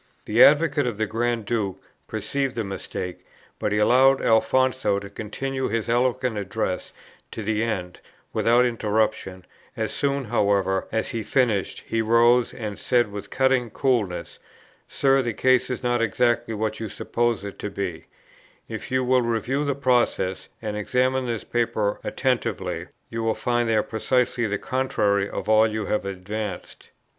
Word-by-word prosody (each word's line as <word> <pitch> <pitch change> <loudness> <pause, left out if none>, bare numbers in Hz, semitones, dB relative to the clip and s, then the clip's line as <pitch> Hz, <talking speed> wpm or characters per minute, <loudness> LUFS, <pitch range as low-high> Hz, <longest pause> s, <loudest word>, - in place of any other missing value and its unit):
The 110 +3 +5
advocate 145 -2 +4
of 115 -4 -3
the 110 - +1
Grand 115 0 -1
Duke 100 -4 -2 0.3
perceived 135 -2 -2
the 115 - -1
mistake, 95 -2 -6 0.4
but 105 - -1
he 105 - +1
allowed 130 +5 +5
Alfonso 125 -2 +2
to 100 0 -7
continue 130 +6 -3
his 115 +1 -2
eloquent 125 -1 +1
address 100 -1 -3 0.4
to 110 - -6
the 105 +1 0
end 95 -6 -3 0.3
without 120 +2 +4
interruption; 105 -5 -1 0.3
as - - -1
soon, 140 -1 0
however, 100 -4 +1
as 110 0 -1
he 115 - -3
had 110 - -7
finished, 115 -8 +1
he 115 - 0
rose, 120 +2 +4
and 105 -4 -6
said 120 -4 +2
with 100 0 -7
cutting 130 -2 +2
coolness, 110 -7 -1 0.5
'Sir, 135 0 +2
the 120 -4 -3
case 130 -1 +3
is 125 0 -4
not 120 -1 +1
exactly 120 +1 +1
what 110 0 -2
you 110 -2 -4
suppose 120 0 -1
it 100 - -8
to 105 - -4
be; 95 -5 -4 0.6
if - - -6
you 130 0 +1
will 125 0 +3
review 120 +4 -1
the 140 -2 0
process, 120 -8 +1
and 105 -1 -3
examine 125 +4 0
this 115 -3 -3
paper 110 -3 -1
attentively, 130 -4 -1 0.2
you 115 0 -3
will 115 -1 0
find 120 -1 0
there 110 -1 +3
precisely 120 +1 0
the 105 0 -1
contrary 100 -6 0
of - - -5
all 110 +1 +5
you 110 -1 -3
have 105 -1 -1
advanced.' 100 +3 -6
115 Hz, 160 wpm, -24 LUFS, 105-125 Hz, 0.6 s, The